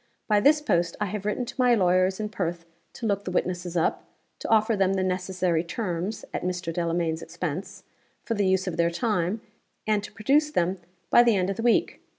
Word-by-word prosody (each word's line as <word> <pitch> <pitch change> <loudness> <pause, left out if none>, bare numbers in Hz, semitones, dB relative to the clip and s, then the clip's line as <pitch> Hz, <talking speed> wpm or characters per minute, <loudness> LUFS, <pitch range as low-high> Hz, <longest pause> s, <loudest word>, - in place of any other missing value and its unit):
By 210 -2 +4
this 295 +7 +4
post 170 - +1
I 210 - 0
have 205 +1 -4
written 245 +4 -1
to - - -8
my 250 -1 +5
lawyers 185 -1 +2
in 210 -1 -2
Perth 175 -4 -3 0.3
to 235 - -6
look 200 -2 0
the - - -4
witnesses 180 -1 -2
up; 165 - 0 0.4
to - - -5
offer 220 0 +3
them 195 -1 +2
the 190 -1 0
necessary 185 -2 0
terms 180 +1 -3
(at - - -2
Mr. 180 -2 -3
Delamayn's 165 -1 -1
expense) - - -5 0.4
for 230 - -2
the 205 -3 +1
use 190 0 +2
of 180 -3 -4
their 170 0 +3
time; 200 +1 -1 0.4
and 210 -1 +1
to - - -8
produce 275 +9 +2
them 185 - 0 0.3
by - - +8
the 235 -3 +4
end 185 0 +1
of 195 - -5
the - - -2
week. 235 0 +2
190 Hz, 205 wpm, -26 LUFS, 175-215 Hz, 0.4 s, by